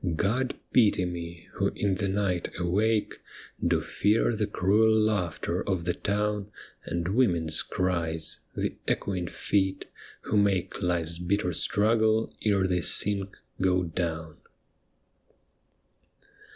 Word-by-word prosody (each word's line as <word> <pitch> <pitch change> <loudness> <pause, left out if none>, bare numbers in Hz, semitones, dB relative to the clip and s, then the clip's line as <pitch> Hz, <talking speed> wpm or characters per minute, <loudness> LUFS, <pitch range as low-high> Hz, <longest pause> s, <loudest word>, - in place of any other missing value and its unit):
God 120 +9 0 0.2
pity 105 -6 +4
me, 85 -1 -6
who - - 0
in 100 -2 0
the 100 +1 -1
night 95 -3 -1
awake 105 +5 0 0.4
Do - - +2
fear 110 +3 +1
the 105 -1 -1
cruel 105 +3 +3
laughter 90 -5 0
of 90 -3 -1
the 90 - +1
town 105 0 -1 0.4
And 85 +1 -2
women's 85 -9 +1
cries, 85 -4 -2
— - - -38
the - - -1
echoing 90 -3 -1
feet, 95 +2 -1 0.4
who 105 - -1
make 95 -3 +1
Life's 85 -2 -1
bitter 90 0 0
struggle 110 +4 +2
ere 100 -3 +2
they 90 -1 +1
sink, 100 +3 +2 0.2
go 90 -1 +2
down. 80 -2 -3
95 Hz, 120 wpm, -27 LUFS, 85-105 Hz, 0.4 s, pity